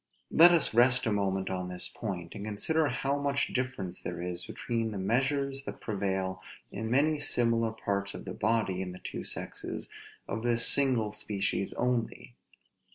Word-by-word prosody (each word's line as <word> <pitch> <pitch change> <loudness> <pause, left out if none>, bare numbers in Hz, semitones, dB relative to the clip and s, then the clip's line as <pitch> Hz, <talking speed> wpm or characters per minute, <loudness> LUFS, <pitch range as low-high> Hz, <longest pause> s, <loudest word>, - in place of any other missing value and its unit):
Let 170 +2 +9
us 170 -8 +2
rest 125 +2 +4
a 115 - +1
moment 95 -2 0
on 90 -1 -3
this 90 0 -4
point; 90 -7 -5
and 100 - -7
consider 145 +10 +1
how 140 +2 -1
much 140 0 0
difference 125 -8 -3
there 85 -1 -5
is 90 0 -3
between 115 -2 -2
the 105 - -5
measures 135 +7 0
that - - -6
prevail 95 -3 -2 0.3
in 110 +2 -4
many 145 +5 +3
similar 115 -5 +2
parts 100 -2 -2
of - - -8
the 90 - -5
body, 105 -4 0
in 90 -1 -4
the 90 - -10
two - - -5
sexes - - -4 0.4
of 110 - -3
this 115 0 +3
single 125 -7 +4
species 100 -2 -1
only. 120 - -2
110 Hz, 165 wpm, -30 LUFS, 95-130 Hz, 0.4 s, Let